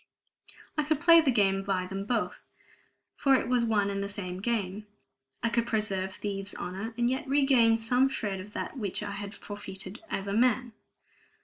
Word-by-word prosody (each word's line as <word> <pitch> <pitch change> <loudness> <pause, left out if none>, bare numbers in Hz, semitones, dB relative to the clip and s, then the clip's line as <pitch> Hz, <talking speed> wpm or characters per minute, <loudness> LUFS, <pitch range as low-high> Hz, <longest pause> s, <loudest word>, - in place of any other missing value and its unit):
I - - +3
could 300 0 0
play 335 0 +7
the 305 - +1
game 195 -5 +3
by 195 -2 -1
them 195 +1 -5
both, 230 0 -1 0.7
for 275 -1 +4
it 255 - 0
was 250 -1 +2
one 210 -3 +2
and 200 0 -2
the 200 - -3
same 185 -3 -5
game. 210 -2 -2 0.6
I 230 - +2
could 235 0 0
preserve 195 -4 0
thieves' 195 0 -4
honor, 195 +6 -5
and 240 0 +2
yet 260 +2 -1
regain 265 -5 +4
some 245 +4 +3
shred 205 -7 -2
of 205 +3 -10
that - - -4
which 205 -1 -2
I 205 - -4
had 200 +1 -6
forfeited 195 0 -7
as 195 - -2
a 200 - -2
man! 245 +1 +2
210 Hz, 185 wpm, -29 LUFS, 195-245 Hz, 0.7 s, play